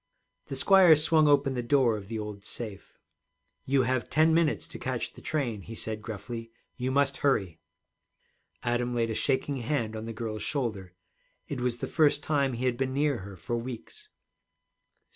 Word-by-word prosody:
The 135 - -4
squire 185 +3 +7
swung 155 +1 +4
open 140 -2 +4
the 125 - -1
door 120 -2 +3
of 100 -2 -7
the 115 +1 -4
old 105 -2 -6
safe. 105 -2 -8 0.7
'You 135 -1 +3
have 130 0 -1
ten 160 +1 +4
minutes 165 -2 +2
to - - -9
catch 130 -2 -3
the - - -13
train,' 125 -9 -2
he 115 +4 -9
said 110 0 -4
gruffly. 115 +2 -6 0.3
'You 125 +1 -2
must 140 +1 +2
hurry.' 95 - +1 1.0
Adam 120 0 0
laid 115 -1 +1
a - - -1
shaking 135 +4 0
hand 115 -3 -1
on 110 0 -5
the - - -4
girl's 110 -1 -4
shoulder. 110 -10 -3 0.5
It 135 -3 -4
was 125 -1 0
the - - -4
first 145 -2 +3
time 140 -4 +1
he 120 +2 -3
had 125 -2 +1
been 130 0 -1
near 145 -3 +1
her 95 +1 -9
for 105 +8 -3
weeks. 120 0 -8
125 Hz, 180 wpm, -28 LUFS, 110-140 Hz, 1.0 s, squire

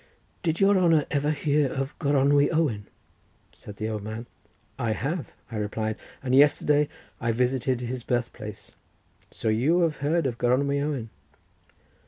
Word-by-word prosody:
"Did 165 -2 0
your 195 0 +5
honour 165 -4 +4
ever 145 +1 +1
hear 150 -2 +1
of 135 +1 -3
Gronwy 145 0 +3
Owen?" 140 -11 0 0.7
said 105 - -11
the 110 - -2
old 110 -1 -3
man. 110 +3 -6 0.5
"I 115 -3 0
have," 145 +4 -3 0.2
I 110 - -4
replied, 110 +1 -2 0.2
"and 130 -2 -1
yesterday 145 +1 +4 0.3
I 115 - 0
visited 125 +1 0
his 125 +1 -4
birth 120 0 -1
place; 105 -2 -9 0.6
so - - -6
you 140 +11 +3
have 160 -3 +1
heard 155 +4 +1
of 120 -3 -2
Gronwy 140 +3 +2
Owen?" 135 -7 -3
135 Hz, 150 wpm, -26 LUFS, 115-150 Hz, 0.7 s, your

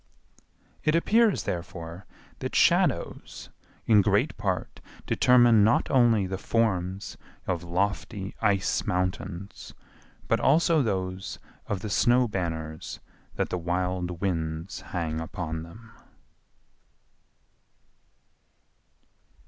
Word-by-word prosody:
It 155 +1 +2
appears, 215 +4 +3
therefore, 85 +1 -6 0.3
that - - -4
shadows - - +1 0.4
in 105 -3 +6
great - - +1
part - - -3 0.3
determine 120 -4 +5
not 110 +3 +2
only 120 -6 +4
the 95 0 -4
forms 95 -5 -1 0.3
of 90 -2 -2
lofty 100 +3 -2
ice 100 -3 +1
mountains, 90 +1 -3 0.5
but - - +2
also 160 +2 +4
those 95 -4 -3 0.3
of 100 -3 -2
the 105 - -4
snow 120 +4 +4
banners 80 -6 -4 0.4
that - - -1
the 90 - -2
wild 90 0 -2
winds 80 -1 -3
hang 80 -3 -3
upon 80 -1 -4
them. 110 +8 -13
95 Hz, 95 wpm, -27 LUFS, 85-115 Hz, 0.5 s, in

